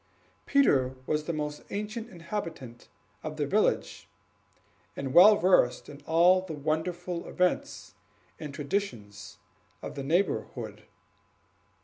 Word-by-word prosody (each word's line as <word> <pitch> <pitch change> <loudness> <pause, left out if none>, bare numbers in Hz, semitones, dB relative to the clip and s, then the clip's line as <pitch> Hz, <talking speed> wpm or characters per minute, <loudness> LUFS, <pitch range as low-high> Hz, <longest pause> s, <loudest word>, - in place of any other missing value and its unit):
Peter 135 - +3
was 150 +2 -1
the 170 - -2
most 150 -2 -4
ancient 215 +3 -5
inhabitant 165 - -7 0.3
of 155 0 -6
the 150 - 0
village, 205 - 0 0.9
and 135 -1 -4
well 205 +5 +9
versed 180 -10 +3
in 145 0 -11
all 175 +3 +5
the 185 -3 -7
wonderful 170 +4 -3
events 180 - -1 0.5
and 150 -3 -6
traditions 115 - -4 0.4
of - - -7
the 140 - -5
neighborhood. 130 - -2
160 Hz, 110 wpm, -28 LUFS, 135-185 Hz, 0.9 s, well